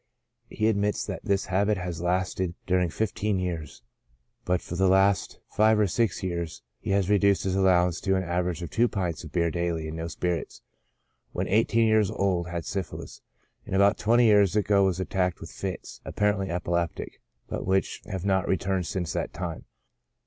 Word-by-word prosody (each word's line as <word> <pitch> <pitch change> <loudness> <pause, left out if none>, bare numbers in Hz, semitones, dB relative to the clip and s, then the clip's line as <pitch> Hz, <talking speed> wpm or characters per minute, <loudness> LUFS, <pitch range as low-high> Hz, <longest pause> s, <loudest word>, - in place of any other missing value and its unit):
He 110 - -2
admits 105 -1 +1
that - - -6
this 100 -1 0
habit 100 +1 +1
has 90 -2 -4
lasted 90 0 -1
during 90 -2 +2
fifteen 105 +1 -1
sears; 85 -7 -4 0.6
but 90 0 +1
for 85 - -7
the 95 +1 +3
last 95 +1 +3
five 110 +1 +4
or 105 - +4
six 100 +2 0
years 85 -3 -4 0.2
he - - -6
has 100 -2 +2
reduced 100 -1 +3
his 95 -1 -1
allowance 90 -3 +3
to 95 - +1
an 95 - 0
average 90 -1 -2
of 85 - -6
two 115 +4 +3
pints 90 -7 -3
of 80 - -9
beer 85 -2 +1
daily, 85 -2 -2
and 80 +1 -6
no 80 0 -3
spirits. 90 0 -3 0.7
When - - -2
eighteen 115 +2 +3
years 110 -3 +3
old 90 -3 0
had 85 -1 -4
syphilis, 95 -3 -5 0.4
and - - -4
about 100 +1 +4
twenty 120 +2 +4
years 105 -3 +5
ago 100 -1 +3
was 95 -1 0
at 95 - -4
tacked 90 -2 0
with 80 - -9
fits 95 -2 -6
(apparently 105 -2 0
epileptic,) 85 -1 -2 0.3
but - - -4
which 95 0 0
have 95 -1 -4
not 95 -1 +1
returned 95 -1 0
since 90 -4 -3
that - - -3
time. - - -5
95 Hz, 180 wpm, -27 LUFS, 85-100 Hz, 0.7 s, years